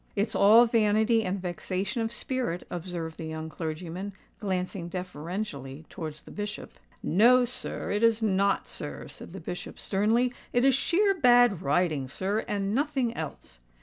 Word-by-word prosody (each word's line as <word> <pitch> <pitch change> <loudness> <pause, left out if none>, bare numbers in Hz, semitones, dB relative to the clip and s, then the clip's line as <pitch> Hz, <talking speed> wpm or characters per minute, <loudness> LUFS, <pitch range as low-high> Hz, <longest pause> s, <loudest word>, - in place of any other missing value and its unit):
"It's 205 +2 0
all 220 +4 +7
vanity 225 0 +3
and 195 0 -2
vexation 185 +4 -3
of 225 0 -1
spirit," 240 -7 -2
observed 170 -2 -5
the 160 - -4
young 160 0 -5
clergyman, 170 +5 -5 0.3
glancing 185 -3 -3
deferentially 165 -5 -5
towards 155 -4 -7
the - - -13
Bishop. 210 0 -5 0.3
"No, 245 +8 +5
sir—it 225 -3 -3
is 230 -1 +4
not, 200 -1 +2
sir," - - -6
said - - -10
the - - -7
Bishop - - -6
sternly: 225 +5 +1 0.2
"it 245 +1 +3
is 270 - +6
sheer 390 +9 +3
bad 245 - +5
riding, 150 -2 +1
sir—and 200 +5 -2
nothing 265 -3 0
else." 145 - -7
200 Hz, 145 wpm, -28 LUFS, 170-230 Hz, 0.3 s, all